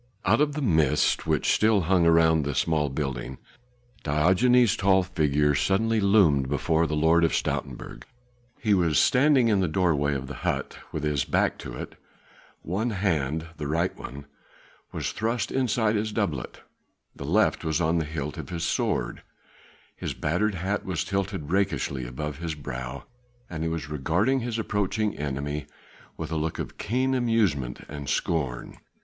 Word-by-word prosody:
Out - - +4
of 150 -1 +2
the 150 0 -3
mist 80 - +2
which - - +2
still 105 -2 +3
hung 90 0 +3
round 80 -1 +4
the 70 -1 -3
small 75 -3 +1
building 65 -2 -4 0.6
Diogenes' 95 +10 +3
tall 95 -1 +3
figure 75 -5 +1
suddenly 110 +8 +1
loomed 95 -10 +4
before 80 +3 +1
the 75 - -2
Lord 80 +2 +4
of 80 - +2
Stoutenburg. - - -4 0.5
He 110 -3 +2
was 85 -6 +2
standing 130 - +4
in 105 -3 +3
the 95 - +1
doorway 75 -4 +1
of 65 -1 -4
the 70 - -8
hut, - - -2
with 75 - -4
his 75 -3 +1
back - - 0
to - - -7
it; - - -8 0.7
one 100 +8 -1
hand 80 - -1
the 75 - -4
right 85 +5 0
one 70 +1 -9 0.7
was - - -3
thrust 115 +2 -2
inside 115 -4 +1
his 110 +1 -1
doublet, 100 - -3 0.5
the - - -8
left 95 +9 +2
was 80 0 0
on 85 0 +2
the 80 - -1
hilt 75 -1 -5
of - - -7
his 85 -2 -4
sword; - - -1 0.7
his - - -5
battered 95 +7 0
hat 95 +4 -2
was 90 -5 -2
tilted 95 -5 -3
rakishly 95 -10 0
above 75 +3 -5
his 80 -2 -3
brow 65 -4 -6 0.5
and 80 -2 -4
he 80 - 0
was 80 -1 -4
regarding 85 - +1
his 120 -2 -3
approaching 105 0 -1
enemy 75 +1 -4 0.5
with - - -5
a 80 - -1
look 80 0 -2
of - - -6
keen 130 +4 0
amusement 110 - 0
and 70 -1 -7
of - - -5
scorn. 70 -8 -2
80 Hz, 165 wpm, -26 LUFS, 75-105 Hz, 0.7 s, Out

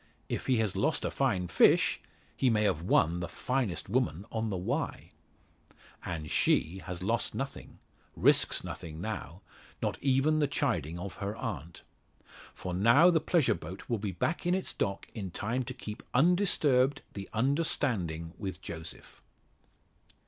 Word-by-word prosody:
If - - -3
he 130 -2 +3
has 110 -3 0
lost 100 +12 +1
a - - -1
fine 100 -10 0
fish, - - +4 0.4
he 130 - +2
may 105 -2 +2
have 80 -7 +1
won 85 -1 +3
the 90 - -3
finest 110 - -2
woman 105 -5 0
on 110 -1 -1
the 95 - -2
Wye! 90 - -3 0.9
And 75 -2 -5
she 90 +5 +2
has 90 -1 -5
lost 115 +4 0
nothing 135 +1 -5 0.4
risks - - +4
nothing 80 -1 -7
now 95 -3 -5 0.4
not - - -2
even 140 +3 +3
the 145 - +3
chiding 90 - -1
of 90 -1 -6
her 100 +2 -3
aunt! 85 -8 -6 0.7
For 90 - -5
now 120 - +6
the 160 -2 +2
pleasure 170 -7 +3
boat 85 +3 -8
will 115 -3 -1
be 100 -1 -2
back 155 - -1
in 180 - +3
its 190 - -3
dock 100 -1 -2
in 100 -5 -5
time 115 +8 -2
to 130 - -5
keep 110 -3 -7
undisturbed 145 -4 +3
the 100 -1 -7
understanding 110 - 0
with 95 -3 -4
Joseph. 80 -3 -9
105 Hz, 155 wpm, -30 LUFS, 90-130 Hz, 0.9 s, now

